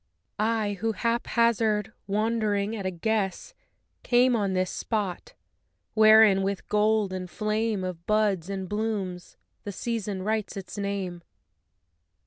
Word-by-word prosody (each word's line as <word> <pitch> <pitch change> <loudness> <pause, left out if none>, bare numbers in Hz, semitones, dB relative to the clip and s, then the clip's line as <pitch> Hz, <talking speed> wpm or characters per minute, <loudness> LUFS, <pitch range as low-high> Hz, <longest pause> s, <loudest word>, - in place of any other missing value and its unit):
I 215 -2 0
who 225 0 0
haphazard, 230 -2 +1
wandering 215 0 0
at 200 -3 -3
a - - +1
guess, 195 - -2 0.5
Came 245 0 +3
on 200 -4 0
this 185 0 0
spot, 215 - -3 0.6
wherein 215 -2 +7
with 195 0 -2
gold 210 -2 +2
and 185 -1 -5
flame 215 0 -1
Of 175 -2 -6
buds 205 -5 +1
and 190 -1 -4
blooms 205 -4 -3 0.3
the 205 - -5
Season 205 -2 -3
writes 215 0 -2
its 195 - -7
name. 200 -4 -3
210 Hz, 120 wpm, -27 LUFS, 190-220 Hz, 0.6 s, wherein